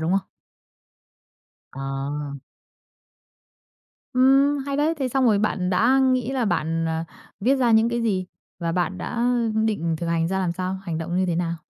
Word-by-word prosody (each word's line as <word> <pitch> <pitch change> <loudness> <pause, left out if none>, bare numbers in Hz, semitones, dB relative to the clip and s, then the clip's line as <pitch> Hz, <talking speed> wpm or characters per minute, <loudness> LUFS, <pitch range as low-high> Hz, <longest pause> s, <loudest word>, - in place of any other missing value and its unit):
đúng 160 +2 -1
không? 195 -2 0 1.4
Ờ. 135 - -10 2.3
Ừm, 270 +3 +4
hay 280 0 -2
đấy! 305 +3 +2
Thế 265 - -1
xong 260 +1 +1
rồi 215 -4 +4
bạn 190 -3 0
đã 240 +9 +3
nghĩ 255 -2 +2
là 260 -3 0
bạn, 165 -3 0
ờ, 160 0 -1 0.4
viết 255 +7 +3
ra 250 -3 +2
những 220 +1 +4
cái 235 0 -1
gì? 195 -5 0 0.3
Và 170 -1 -1
bạn 180 +2 -1
đã 235 0 -3 0.4
định 170 -7 0
thực 170 - -3
hành 165 0 +1
ra 190 +2 -1
làm 180 -2 0
sao? 185 +2 -3
Hành 170 -4 -3
động 170 +2 -3
như 185 - +2
thế 175 -2 -1
nào? 170 -1 -1
195 Hz, 175 wpm, -23 LUFS, 170-255 Hz, 2.3 s, Ừm